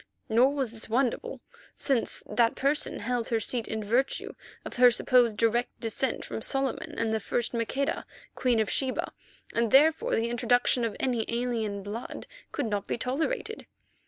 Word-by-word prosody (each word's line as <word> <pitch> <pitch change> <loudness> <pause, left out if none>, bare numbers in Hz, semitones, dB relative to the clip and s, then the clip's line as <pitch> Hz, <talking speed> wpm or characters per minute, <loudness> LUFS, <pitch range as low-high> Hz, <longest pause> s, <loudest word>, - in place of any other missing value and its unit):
Nor 250 +6 +4
was 265 -5 -1
this 225 -1 -11
wonderful, 265 - 0 0.4
since 265 -5 0
that 230 +2 +2
person 285 +2 0
held 235 +1 -1
her 230 - +1
seat 230 +1 -1
in 220 -1 -3
virtue 240 +6 0 0.3
of - - -7
her 250 0 +8
supposed 240 -2 +3
direct 230 +2 +1
descent 235 +3 -1
from - - -5
Solomon 270 +2 -2
and 225 -1 0
the 220 - +1
first 240 +3 -2
Maqueda, 240 +4 -1 0.3
Queen 245 -3 +1
of 220 - +2
Sheba, 260 +3 -1 0.4
and 230 -1 +1
therefore 305 +6 +4
the 230 +1 0
introduction 245 +1 +2
of 230 -2 -2
any 245 -4 0
alien 230 -4 -2
blood 215 +5 -6 0.3
could 290 - -2
not 205 -3 -2
be - - -1
tolerated. 320 - -2
240 Hz, 160 wpm, -28 LUFS, 225-265 Hz, 0.4 s, her